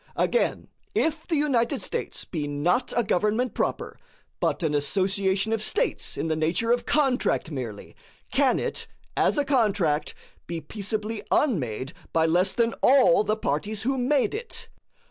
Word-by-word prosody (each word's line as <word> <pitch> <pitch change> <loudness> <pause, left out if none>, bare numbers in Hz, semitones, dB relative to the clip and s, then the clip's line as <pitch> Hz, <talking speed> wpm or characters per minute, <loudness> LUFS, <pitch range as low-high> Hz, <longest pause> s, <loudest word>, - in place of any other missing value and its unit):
Again, 485 - 0 0.3
if 320 -5 0
the 335 - 0
United 275 -6 +1
States - - -4
be 155 -4 -4
not 170 - 0
a 240 - +4
government 210 +5 +1
proper, - - -2 0.4
but - - 0
an 155 -2 +1
association 190 +7 +1
of 225 - 0
States 420 - -1
in - - -2
the 160 -1 0
nature 165 +9 +1
of 240 0 +1
contract 270 - +1
merely, 120 -7 -6 0.4
can 270 -1 +3
it, - - -3 0.3
as - - +2
a 290 - +2
contract, 205 - +1 0.3
be 170 -1 -3
peaceably 210 +6 -4
unmade 135 - 0 0.2
by 160 -1 +3
less 175 +4 +3
than 235 -1 +1
all 255 -3 +5
the 215 +1 0
parties 205 +5 -2
who 270 +3 +1
made 260 +1 +1
it? 460 +2 -6
210 Hz, 150 wpm, -26 LUFS, 165-255 Hz, 0.4 s, all